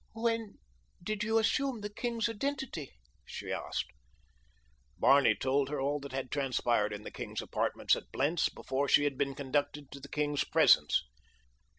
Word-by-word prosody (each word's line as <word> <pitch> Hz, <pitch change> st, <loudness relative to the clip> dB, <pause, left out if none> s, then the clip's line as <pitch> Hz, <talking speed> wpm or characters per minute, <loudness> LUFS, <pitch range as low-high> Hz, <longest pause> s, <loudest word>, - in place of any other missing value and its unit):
"When 225 Hz, -2 st, -1 dB, 0.5 s
did 210 Hz, +2 st, -2 dB
you 220 Hz, +1 st, +2 dB
assume 240 Hz, +2 st, +1 dB
the 205 Hz, 0 st, -6 dB
king's 235 Hz, -1 st, -1 dB
identity?" 235 Hz, -, -3 dB, 0.3 s
she -, -, -6 dB
asked. -, -, -3 dB, 1.1 s
Barney 140 Hz, 0 st, +5 dB
told 135 Hz, +1 st, +1 dB
her 150 Hz, -1 st, -2 dB
all 145 Hz, +2 st, 0 dB
that 140 Hz, 0 st, -8 dB
had 130 Hz, -1 st, -4 dB
transpired 120 Hz, -6 st, +1 dB
in 105 Hz, 0 st, -6 dB
the -, -, -7 dB
king's -, -, -5 dB
apartments -, -, +1 dB
at -, -, -9 dB
Blentz 150 Hz, +5 st, +1 dB
before 135 Hz, +2 st, -2 dB
she 145 Hz, -, +5 dB
had 145 Hz, -2 st, 0 dB
been 140 Hz, 0 st, -1 dB
conducted 145 Hz, +1 st, -2 dB
to 140 Hz, -, -8 dB
the 140 Hz, +1 st, -11 dB
king's 145 Hz, -1 st, 0 dB
presence. -, -, +4 dB
145 Hz, 160 wpm, -32 LUFS, 135-215 Hz, 1.1 s, Barney